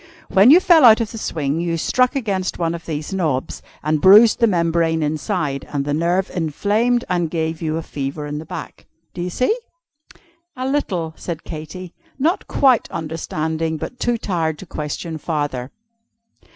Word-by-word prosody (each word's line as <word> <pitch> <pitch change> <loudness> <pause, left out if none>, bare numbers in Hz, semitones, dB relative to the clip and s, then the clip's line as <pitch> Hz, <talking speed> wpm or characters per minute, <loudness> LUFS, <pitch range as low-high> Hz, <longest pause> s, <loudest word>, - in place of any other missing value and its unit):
When 195 +5 +6
you 320 +6 +9
fell 340 -4 +5
out 225 -2 +8
of 225 -2 -2
the 225 - -7
swing, 150 -5 -2
you 170 -1 -1
struck 250 - +1
against 200 -8 -2
one 165 -1 -1
of 170 -1 -8
these 155 +2 -4
knobs, 155 -9 -2 0.2
and 155 0 0
bruised 210 +7 +7
the 230 - +4
membrane 165 -3 +1
inside, 150 -2 -2
and 140 -1 -2
the 145 - -1
nerve 175 +5 0
inflamed, 210 - 0
and 175 -3 0
gave 160 0 -2
you 160 -1 -1
a 165 - -4
fever 145 +1 -5
in 150 0 -4
the 160 - -8
back. - - -8 0.3
Do 175 - -6
you 180 - -2
see?" 255 - +1 1.0
"A 255 0 -3
little," 185 - -1
said 165 -2 -6
Katy, 170 +3 -8 0.2
not 320 +8 0
quite 260 -5 +3
understanding, 160 0 -3
but 245 - -7
too 240 -1 0
tired 165 -7 -2
to 190 - -10
question 155 0 -5
farther. 145 -6 -3
170 Hz, 170 wpm, -20 LUFS, 155-210 Hz, 1.0 s, you